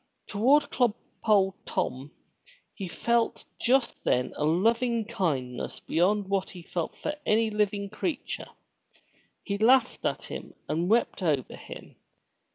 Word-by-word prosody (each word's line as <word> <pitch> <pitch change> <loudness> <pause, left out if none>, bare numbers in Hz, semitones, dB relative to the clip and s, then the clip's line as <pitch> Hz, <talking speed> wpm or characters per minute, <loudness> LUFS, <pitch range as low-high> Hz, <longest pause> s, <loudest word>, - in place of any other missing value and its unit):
Toward 275 +8 +3
clodpole 210 -4 +1
Tom 130 +3 -2 0.6
he 195 - -5
felt 235 +6 0
just 260 +1 +2
then 125 0 +1
a - - -2
loving 225 +8 +2
kindness 145 - -2
beyond 195 +4 +1
what 195 -1 0
he 175 -2 -10
felt 170 0 -4
for 300 - -2
any 220 -2 +2
living 205 -1 0
creature. 275 - -4 0.9
He 200 -1 -3
laughed 245 +2 +4
at - - -3
him - - -8
and 165 +4 0
wept 230 -2 +2
over 150 -8 0
him. - - -11
205 Hz, 125 wpm, -28 LUFS, 175-235 Hz, 0.9 s, laughed